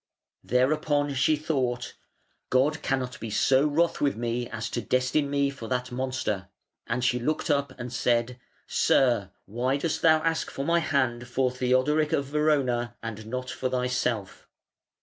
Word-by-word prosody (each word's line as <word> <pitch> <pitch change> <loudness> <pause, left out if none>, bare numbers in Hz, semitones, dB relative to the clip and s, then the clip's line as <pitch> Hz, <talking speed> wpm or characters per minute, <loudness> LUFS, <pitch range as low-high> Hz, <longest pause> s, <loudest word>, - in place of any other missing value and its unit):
Thereupon 145 +3 +1
she 140 +4 +3
thought, 130 -5 -2 0.6
"God 140 +5 +2
cannot 130 -2 -2
be 115 - -5
so 130 +6 +3
wroth 165 +3 +1
with 140 -1 +2
me 120 +1 -2
as 115 0 -4
to 120 - -2
destine 130 +4 +1
me 140 -1 +1
for 130 -5 -8
that 125 0 -2
monster". 125 -7 -2 0.4
And 120 +2 -1
she 125 -1 +2
looked 155 +5 -1
up 140 -2 0
and 120 0 -6
said, 120 0 0 0.3
"Sir! 120 -7 +2 0.2
why 125 +6 -1
dost 160 +2 -2
thou 160 -1 +6
ask 165 -1 0
for 135 - -4
my 170 +2 +3
hand 130 -6 0
for 125 +1 0
Theodoric, 130 +5 +1
of 140 - +1
Verona, 135 -5 +1
and 110 -1 -6
not 125 +2 -4
for 130 - -2
thyself?" 125 -5 -2
130 Hz, 155 wpm, -27 LUFS, 120-145 Hz, 0.6 s, thou